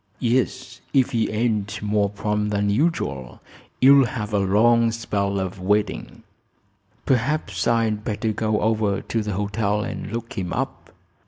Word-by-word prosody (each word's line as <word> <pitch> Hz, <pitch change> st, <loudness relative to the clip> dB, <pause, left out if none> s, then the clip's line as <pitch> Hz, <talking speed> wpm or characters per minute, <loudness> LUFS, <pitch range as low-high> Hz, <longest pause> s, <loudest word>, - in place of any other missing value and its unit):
"Yes; 130 Hz, +1 st, -1 dB
if 135 Hz, 0 st, +3 dB
he 115 Hz, -3 st, 0 dB
ain't 105 Hz, -2 st, -1 dB
more 105 Hz, -1 st, +1 dB
prompt 105 Hz, +1 st, -2 dB
than 100 Hz, 0 st, 0 dB
usual 100 Hz, -, -1 dB, 0.4 s
you'll 135 Hz, 0 st, +7 dB
have 105 Hz, -1 st, -5 dB
a 105 Hz, -, +3 dB
long 115 Hz, +4 st, +3 dB
spell 100 Hz, -4 st, -2 dB
of 95 Hz, 0 st, -4 dB
waiting." 105 Hz, +3 st, -1 dB, 0.8 s
"Perhaps 125 Hz, -, 0 dB
I'd 115 Hz, -2 st, +1 dB
better 110 Hz, +1 st, -1 dB
go 110 Hz, 0 st, 0 dB
over 105 Hz, -2 st, +1 dB
to 115 Hz, -, -2 dB
the 105 Hz, -1 st, -3 dB
hotel 105 Hz, +1 st, -1 dB
and -, -, -6 dB
look 115 Hz, 0 st, -5 dB
him 90 Hz, -3 st, -4 dB
up. -, -, -4 dB
105 Hz, 145 wpm, -23 LUFS, 100-115 Hz, 0.8 s, you'll